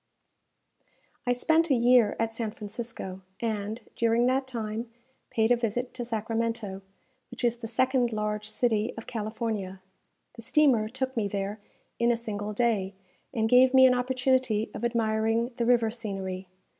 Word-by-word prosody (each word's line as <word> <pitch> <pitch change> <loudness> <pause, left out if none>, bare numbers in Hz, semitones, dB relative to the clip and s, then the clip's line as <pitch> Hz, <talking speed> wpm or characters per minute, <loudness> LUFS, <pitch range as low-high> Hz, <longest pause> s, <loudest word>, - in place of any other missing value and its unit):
I 245 - +4
spent 320 +6 +2
a 270 - +4
year 240 -2 +4
at 225 0 0
San 225 -1 -3
Francisco, 210 -3 -7 0.2
and, 220 0 -3
during 235 +1 +2
that 260 +1 +1
time, 225 -1 -4 0.4
paid 225 +1 +1
a - - +7
visit 240 +1 -2
to 250 -1 -4
Sacramento, 225 -3 -2 0.5
which 245 - -8
is 240 0 +2
the 230 -1 -6
second 255 +1 +1
large 210 0 -2
city 225 -1 0
of 225 - -7
California. 215 -4 -4 0.5
The 230 - -11
steamer 240 -4 +3
took 260 +2 -3
me 220 -3 0
there 200 +1 -3 0.4
in 235 +1 +4
a 235 - +1
single 210 -2 -4
day, 210 -4 0 0.4
and 220 -4 0
gave 255 +2 +6
me 260 0 +9
an 255 - +6
opportunity 250 -3 +1
of - - -7
admiring 225 0 +1
the 235 - 0
river 235 -2 +3
scenery. 195 -5 -5
230 Hz, 155 wpm, -28 LUFS, 215-245 Hz, 0.5 s, me